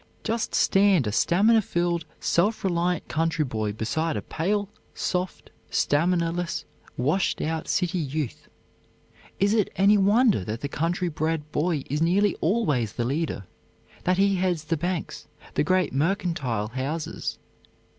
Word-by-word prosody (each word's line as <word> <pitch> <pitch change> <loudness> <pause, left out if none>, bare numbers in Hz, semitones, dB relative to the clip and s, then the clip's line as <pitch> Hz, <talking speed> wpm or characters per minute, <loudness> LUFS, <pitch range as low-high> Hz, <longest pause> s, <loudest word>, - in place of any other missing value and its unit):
Just 225 0 -1
stand 195 -7 +4
a 105 - -1
stamina 205 - +4
filled, 175 -3 -1
self 205 +6 +1
reliant 175 -2 0
country 165 -1 0
boy 110 -4 -2
beside 155 +10 -1
a - - -4
pale, 200 +5 -1 0.3
soft, 180 0 -3 0.2
stamina 170 +3 +2
less, 175 0 -3 0.3
washed 150 +10 +1
out 160 0 -2
city 180 0 0
youth. 150 -3 -4 0.9
Is 200 +2 +3
it 215 -3 +2
any 200 +2 +5
wonder 210 - +4
that 110 +5 -5
the 140 - -2
country 175 +5 -1
bred 155 -1 -2
boy 155 -2 0
is 150 +3 -2
nearly 190 +4 +3
always 150 - +1
the 120 - -2
leader; 140 - -2 0.6
that 180 0 +2
he 195 0 +3
heads 180 -4 0
the 160 +2 -1
banks, 175 +1 -3 0.3
the - - +2
great 185 +2 +1
mercantile 140 - 0
houses? 140 +6 -3
170 Hz, 140 wpm, -25 LUFS, 150-190 Hz, 0.9 s, any